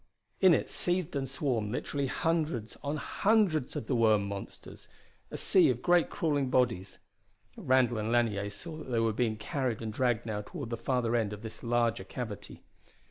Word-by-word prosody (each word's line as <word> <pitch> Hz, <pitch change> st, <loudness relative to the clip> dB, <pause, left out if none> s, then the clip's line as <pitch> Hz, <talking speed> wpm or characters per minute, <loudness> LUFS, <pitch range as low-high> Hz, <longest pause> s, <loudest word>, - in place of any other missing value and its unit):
In 185 Hz, -4 st, +7 dB
it -, -, -1 dB
seethed 175 Hz, -3 st, 0 dB
and 135 Hz, -2 st, -2 dB
swarmed 125 Hz, -6 st, -1 dB
literally 140 Hz, +3 st, -2 dB
hundreds 155 Hz, -7 st, -1 dB
on 145 Hz, +2 st, -2 dB
hundreds 195 Hz, -, +1 dB
of -, -, -3 dB
the 130 Hz, -, -1 dB
worm 110 Hz, -3 st, +3 dB
monsters, 100 Hz, 0 st, -8 dB, 0.4 s
a -, -, -6 dB
sea 185 Hz, -6 st, +4 dB
of 125 Hz, -1 st, -1 dB
great 175 Hz, -1 st, +4 dB
crawling 145 Hz, -5 st, 0 dB
bodies. 115 Hz, -8 st, 0 dB, 0.6 s
Randall 125 Hz, -3 st, +2 dB
and 110 Hz, +2 st, -2 dB
Lanier 110 Hz, -4 st, +1 dB
saw 155 Hz, +10 st, -6 dB
that 155 Hz, -, -9 dB
they 120 Hz, -2 st, +1 dB
were 115 Hz, -1 st, +2 dB
being 110 Hz, -1 st, 0 dB
carried 125 Hz, +1 st, -2 dB
and 110 Hz, -1 st, -5 dB
dragged 120 Hz, -1 st, +1 dB
now 105 Hz, -2 st, -3 dB
toward 135 Hz, -, -7 dB
the -, -, 0 dB
farther 120 Hz, 0 st, 0 dB
end 110 Hz, -3 st, 0 dB
of 105 Hz, +1 st, -9 dB
this 110 Hz, -, -7 dB
larger 120 Hz, -1 st, +1 dB
cavity. 115 Hz, -6 st, -7 dB
120 Hz, 180 wpm, -30 LUFS, 110-145 Hz, 0.6 s, In